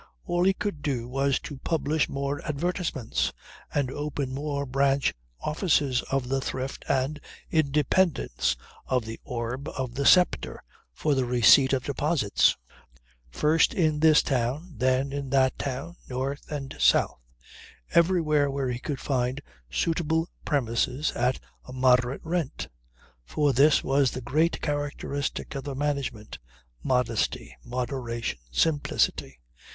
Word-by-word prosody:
All 175 +1 +1
he 195 - +5
could 195 -8 -3
do 125 -5 -2
was 135 +2 +1
to 145 -3 -8
publish 155 0 0
more 140 +1 -3
advertisements 150 - -1 0.4
and 140 -3 0
open 145 -2 -3
more 140 0 -2
branch 135 +1 +2 0.3
offices 150 -5 +1
of 135 -2 0
the 135 +1 0
Thrift 130 0 -4
and 140 +3 0 0.3
Independence, 150 - +1 0.3
of 125 -3 0
The 115 0 -7
Orb, 125 +3 -4
of 130 -2 -4
The 140 +2 0
Sceptre, 180 -2 +3 0.3
for 150 - 0
the 130 -2 +1
receipt 125 +2 +6
of 130 -2 +1
deposits; 140 -5 +2 0.7
first 150 - +2
in 155 -4 +2
this 155 -1 +6
town, 135 +7 -1
then 130 +3 +1
in 140 -1 -4
that 130 -1 +2
town, 140 +6 -4
north 135 +3 -4
and 140 -2 -5
south - - +3 0.7
everywhere 160 -4 +3
where 135 -1 -2
he 120 - -4
could 140 0 -4
find 130 0 -1 0.3
suitable 160 - 0
premises 130 +1 0
at 125 +1 0 0.3
a - - -10
moderate 125 0 +3
rent. 165 -4 -3 0.5
For 145 - +1
this 140 +4 +5
was 135 -1 +3
the 130 - -6
great 155 +7 +1
characteristic 145 -1 -3
of 135 -1 -5
the 140 -2 -4
management. 140 -6 -3 0.4
Modesty, 115 - 0
moderation, 120 - -3
simplicity. 105 - 0
140 Hz, 130 wpm, -27 LUFS, 125-150 Hz, 0.7 s, receipt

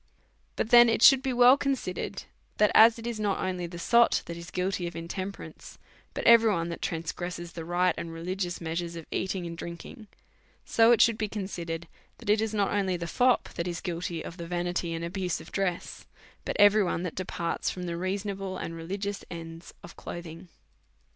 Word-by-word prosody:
But 220 - -2
then 240 -1 +8
it 225 - +1
should 270 -2 +8
be 265 -1 -1
well 245 +1 +7
considered, 245 -9 -3 0.3
that 210 0 +4
as 225 +1 +7
it 230 - -9
is 235 -2 -3
not 205 -2 0
only 180 -2 -3
the 175 0 -9
sot 235 +7 +3
that 170 - -6
is 170 +1 -9
guilty 185 -1 -2
of 170 - -8
intemperance^ 185 +4 -7 0.4
but - - -3
every 230 -1 +7
one 170 -3 -1
that 170 - -6
transgresses 170 +1 -4
the 165 0 -7
right 175 +1 +1
and 165 - -6
religious 175 +2 -4
measures 170 +1 -4
of 165 -2 -8
eating 190 -1 -2
and 170 0 -6
drinking; 170 +7 -9 0.6
so 225 +1 +4
it 235 - +5
should 230 -1 +4
be 215 - 0
con 210 -1 -4
sidered, 170 -3 -5 0.3
that 225 -3 -1
it 215 +1 +3
is 220 -1 -1
not 205 -2 0
only 190 -3 0
the 170 - -5
fop 250 +8 +2
that 170 - -3
is 175 -1 -3
guilty 170 -1 -4
of 170 - -8
the 170 -1 -7
vanity 175 0 -2
and 165 +1 -4
abuse 180 0 -2
of 160 - -13
dress, 190 -3 -3 0.4
but - - -3
every 205 +1 +6
one 175 -1 -2
that 180 - -4
departs 175 -2 -3
from 180 - -5
the 170 -1 -3
reasonable 195 +1 -3
and 165 - -5
religious 195 +4 -4
ends 165 -1 -9
of 175 - -11
clothing. 175 +1 -8
180 Hz, 200 wpm, -28 LUFS, 170-205 Hz, 0.6 s, then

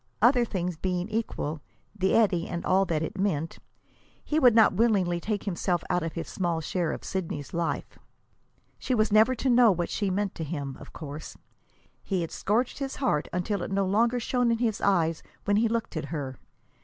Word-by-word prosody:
Other 240 +2 +5
things 180 -5 -3
being 180 +1 -2
equal, 185 -9 -3 0.3
the 190 -2 +1
eddy 195 -7 +3
and 170 -1 -4
all 190 +1 +3
that 160 -3 -1
it 175 - -5
meant, 165 -5 -1 0.6
he 310 - +1
would 250 -6 +6
not 220 -3 +6
willingly 190 -5 +2
take 210 +3 -2
himself 175 -3 -1
out 180 - +2
of 165 -1 -3
his 165 - -5
small 175 -3 -1
share 165 0 -1
of - - -6
Sidney's 165 -7 -4
life. 170 -1 -3 0.8
She 255 - 0
was 215 -1 +2
never 220 +4 +5
to 265 - -2
know 240 -3 +6
what 175 -2 -2
she 200 -2 0
meant 195 +1 -1
to 160 - -5
him, 140 -4 -4
of - - -12
course. 150 -1 -8 0.6
He 190 -3 -1
had 165 - -4
scourged 230 +7 0
his 275 -1 -3
heart 200 - 0
until 180 +2 -1
it - - -4
no 195 0 +1
longer 230 +6 +2
shone 245 +1 +1
in 230 - +2
his 225 -3 -1
eyes 165 -5 +2 0.2
when 205 0 +3
he 230 +2 +3
looked 230 -3 -2
at 155 -1 -2
her. 145 -4 -4
190 Hz, 195 wpm, -27 LUFS, 170-225 Hz, 0.8 s, would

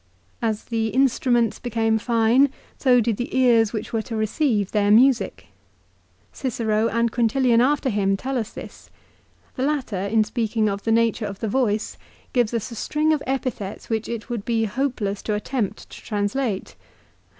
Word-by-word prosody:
As 220 -2 -1
the 225 -1 -2
instru 265 -1 +2
ments 235 -3 +2
became 225 -2 0
fine 235 +4 +3 0.3
so 250 -2 +4
did 225 -2 0
the 245 +2 -3
ears 230 -4 +4
which 220 0 -5
were 225 - +1
to 225 +1 -6
receive 215 - 0
their 205 -1 +2
music. 245 +3 +3 0.8
Cicero, 225 -4 0
and 230 0 0
Quintilian 240 +1 +3
after 280 +2 +2
him, 200 -4 +1
tell 265 +6 -4
us 220 -1 -4
this. - - -11 0.7
The 255 - -1
latter 265 -9 -1
in 220 +1 +3
speaking 220 -1 -1
of 200 -1 -2
the 225 - +1
nature 230 -1 +2
of 200 -1 -7
the 225 - -2
voice 220 -2 0 0.4
gives 240 -4 +2
us 230 0 -3
a - - -7
string 305 +7 +1
of 300 - -1
epithets 255 -7 -4
which 220 -1 -1
it 230 -1 -5
would 235 -4 -4
be 225 -1 0
hopeless 220 -4 -2
to 210 - -2
attempt 210 0 -3
to - - -11
translate. 205 - -2
230 Hz, 170 wpm, -23 LUFS, 215-250 Hz, 0.8 s, so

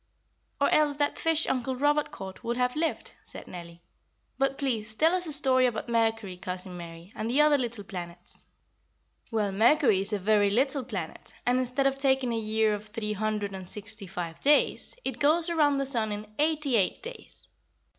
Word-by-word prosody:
"Or 280 - +3
else 300 -1 +3
that 290 0 -1
fish 325 -1 +3
Uncle 260 0 -1
Robert 290 +3 +2
caught 190 +2 -9
would 235 +1 -2
have 250 0 0
lived," 325 +1 -2
said - - -8
Nellie. 170 -1 -10 0.6
"But 270 0 +1
please 225 -6 -1
tell 320 +7 +4
us 365 -1 0
a - - -3
story 260 -3 +4
about 235 0 -4
Mercury, 225 -5 0
Cousin 180 0 -5
Mary, 170 +2 -10
and 220 - -3
the 260 +5 +2
other 300 0 +6
little 235 -4 -3
planets." 175 -2 -8 0.9
"Well, 215 -4 0
Mercury 225 +1 +4
is 195 +2 +1
a 210 - +1
very 205 +1 +3
little 270 +6 +1
planet, 195 -10 -7
and 250 +1 +3
instead 255 +2 0
of 270 0 +1
taking 265 -3 +2
a 225 - 0
year 220 0 +1
of 210 +1 -5
three 210 0 -3
hundred 210 -1 -2
and 190 -1 -7
sixty 210 -1 -4
five 170 -2 -5
days, 290 +6 +3
it 260 -2 -3
goes 320 +4 +3
around 295 -4 +3
the 275 - 0
sun 230 -5 +1
in 210 +1 -4
eighty 300 -4 +2
eight 195 - 0
days. 480 +2 -5
230 Hz, 185 wpm, -28 LUFS, 205-275 Hz, 0.9 s, other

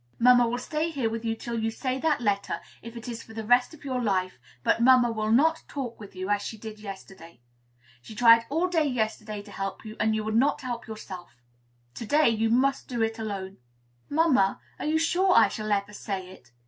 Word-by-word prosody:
Mamma 245 0 +6
will 240 - -1
stay 305 +6 -2
here 265 -8 -1
with 225 0 -4
you 225 -1 -1
till 235 0 -4
you 225 0 0
say 255 +3 -3
that 300 -2 +1
letter, 200 -3 -1 0.2
if 230 +1 -9
it 230 - -9
is 230 -2 -5
for 220 - -14
the 220 -1 -5
rest 245 +2 +4
of 300 - -17
your 255 -2 -2
life; 185 - -1 0.2
but - - +2
mamma 250 -1 +6
will 215 -1 -1
not 320 +7 +4
talk 255 -5 -5
with 205 -3 -11
you, 185 +1 -4
as 205 0 +2
she 220 - -6
did 215 0 -9
yesterday. 190 - -10 0.6
She 215 - -11
tried 230 0 +6
all 325 +6 +1
day 330 -4 +1
yesterday 215 -4 -3
to 205 - -14
help 195 +1 -5
you, 215 0 -8
and 220 0 +2
you 215 - -1
would 220 0 -3
not 270 +5 +2
help 245 -3 -5
yourself; 185 - -9 0.6
to 230 - -7
day 300 +2 +4
you 225 0 +1
must 270 +4 +2
do 240 -3 -1
it 225 0 -2
all 220 - -3
alone." 195 -2 -5 0.5
"Mamma, 290 -11 +3 0.2
are - - -4
you 315 +1 +2
sure 360 +3 +2
I - - +6
shall 215 -1 -4
ever 200 0 0
say 190 -3 -5
it?" 120 -10 -17
225 Hz, 225 wpm, -27 LUFS, 210-255 Hz, 0.6 s, Mamma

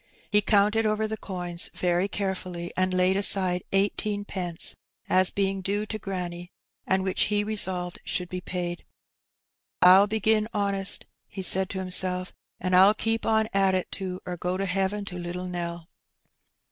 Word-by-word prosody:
He 210 0 +4
counted 210 +2 +2
over 215 0 0
the 220 - -3
coins 180 -4 -2
very 180 +1 0
carefully, 185 -3 -4
and 185 0 +1
laid 185 +1 +2
aside 190 -2 +3
eighteenpence 195 -3 0 0.3
as 185 0 +5
being 195 -1 -1
due 205 +3 -1
to 215 0 -5
granny, 175 -2 -6 0.4
and 190 0 +1
which 190 -1 +1
he 205 0 +1
resolved 190 -4 -2
should 180 -1 -2
be 180 +1 -6
paid. 175 -1 -5 1.0
^'PU 190 +3 +7
begin 215 0 +1
honest," 200 -1 +2 0.2
he 190 - -7
said 190 +1 +5
to 195 - -5
himself, 185 0 -1 0.3
''an' 185 - -3
Pll 190 +3 +6
keep 225 0 -1
on 220 -1 +2
at 195 -1 +3
it 185 - -3
too, 185 -2 -5
or 180 -1 -5
go 180 +2 -2
to 195 - -1
heaven 195 +2 -1
to 180 -2 -7
Httle 180 +1 -5
Nell." 170 -2 -5
190 Hz, 160 wpm, -26 LUFS, 180-205 Hz, 1.0 s, ^'PU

